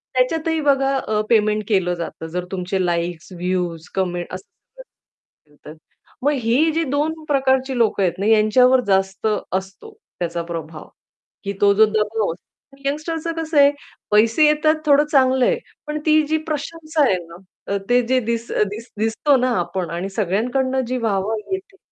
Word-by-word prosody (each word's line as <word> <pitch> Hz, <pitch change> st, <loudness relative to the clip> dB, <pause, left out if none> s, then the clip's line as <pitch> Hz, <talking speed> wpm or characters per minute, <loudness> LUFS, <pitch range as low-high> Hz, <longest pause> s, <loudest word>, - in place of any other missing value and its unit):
त्याच्यातही 320 Hz, +5 st, +1 dB
बघा 275 Hz, -1 st, +2 dB
अ, 215 Hz, -5 st, -1 dB
पेमेंट 215 Hz, -2 st, +2 dB
केलं 185 Hz, -4 st, +2 dB
जातं. 165 Hz, -1 st, -6 dB
जर 180 Hz, 0 st, -2 dB
तुमचे 185 Hz, 0 st, -2 dB
लाइक्स, 170 Hz, 0 st, -2 dB
व्ह्यूज, 175 Hz, -2 st, -3 dB
कमेंट्स 175 Hz, -2 st, -2 dB
असतील 185 Hz, -, -18 dB
तर. 150 Hz, -, -9 dB, 0.5 s
मग 290 Hz, -, +3 dB
ही 275 Hz, +8 st, +3 dB
जी 325 Hz, +1 st, 0 dB
2 310 Hz, +2 st, -1 dB
प्रकारची 265 Hz, -2 st, +1 dB
लोकं 220 Hz, -4 st, +2 dB
आहेत 175 Hz, -1 st, -1 dB
ना, 200 Hz, -, -1 dB
यांच्यावर 225 Hz, +4 st, +4 dB
जास्त 190 Hz, +1 st, +1 dB, 0.3 s
असतो 190 Hz, -, -5 dB, 0.3 s
त्याचा 170 Hz, -1 st, -2 dB
प्रभाव. 160 Hz, -2 st, -7 dB, 0.6 s
की 200 Hz, -1 st, -3 dB
तो 200 Hz, 0 st, +5 dB
जो 220 Hz, +2 st, +6 dB
दबाव 215 Hz, -1 st, 0 dB
असतो, 275 Hz, +9 st, -23 dB
यंगस्टरचं 320 Hz, +3 st, -3 dB
कसं 320 Hz, -1 st, -3 dB
आहे, 280 Hz, 0 st, +7 dB, 0.4 s
पैसे 225 Hz, +8 st, +4 dB
येतात 305 Hz, +1 st, +3 dB
थोडं 290 Hz, 0 st, +5 dB
चांगलं 260 Hz, -3 st, +4 dB
आहे. -, -, +2 dB, 0.3 s
पण 300 Hz, 0 st, -3 dB
ती 310 Hz, 0 st, +5 dB
जी 315 Hz, +1 st, +1 dB
प्रशंसा 310 Hz, +1 st, -2 dB
आहे 195 Hz, -, +3 dB
ना, 170 Hz, -, -12 dB, 0.4 s
अ, -, -, +1 dB
ते 245 Hz, 0 st, +4 dB
जे 260 Hz, +1 st, +3 dB
दिस 235 Hz, 0 st, -2 dB, 0.2 s
दिस 225 Hz, +3 st, -8 dB
दिसतो 225 Hz, +6 st, +2 dB
ना 255 Hz, 0 st, +1 dB
आपण 175 Hz, 0 st, -3 dB
आणि 185 Hz, +3 st, -3 dB
सगळ्यांकडनं 250 Hz, +7 st, 0 dB
जी 255 Hz, +1 st, -2 dB
वाह-वाह 220 Hz, -2 st, -1 dB
भेटते, 385 Hz, +1 st, -5 dB
230 Hz, 160 wpm, -21 LUFS, 190-285 Hz, 0.6 s, आहे